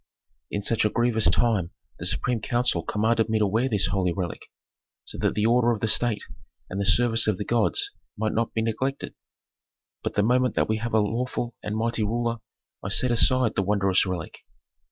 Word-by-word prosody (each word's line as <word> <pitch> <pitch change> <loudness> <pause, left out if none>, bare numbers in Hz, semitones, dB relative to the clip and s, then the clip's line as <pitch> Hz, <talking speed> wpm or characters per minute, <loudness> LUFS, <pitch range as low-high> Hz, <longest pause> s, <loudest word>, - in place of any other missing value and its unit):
"In 105 - -3
such 115 +2 +1
a 105 - +2
grievous 120 -1 +2
time 105 -8 +1 0.3
the 85 - -3
supreme 115 +5 -1
council 120 -7 +1
commanded 110 +5 0
me 110 - +1
to 105 - +2
wear 115 +6 0
this 105 -5 +1
holy 90 -1 0
relic, 90 -1 -5 0.6
so - - -6
that - - 0
the 105 0 +1
order 120 +1 +3
of 110 - -4
the 110 - -1
state 110 -1 +1 0.5
and 95 +2 -2
the 100 - -1
service 115 +2 +3
of 105 -4 +1
the 105 - -4
gods 115 -2 +2 0.3
might 110 0 -1
not 115 +1 -1
be 110 - 0
neglected. 130 +5 -3 0.9
But - - -4
the 100 - +2
moment 125 +2 +2
that - - +1
we 110 - 0
have 115 +1 -3
a - - +5
lawful 120 +3 -2
and 105 +1 -4
mighty 115 0 -1
ruler 115 +2 -1 0.4
I 95 - -5
set 125 +4 +4
aside 125 0 +3
the - - +1
wondrous 100 -1 +2
relic." 90 -4 -5
110 Hz, 195 wpm, -25 LUFS, 100-120 Hz, 0.9 s, a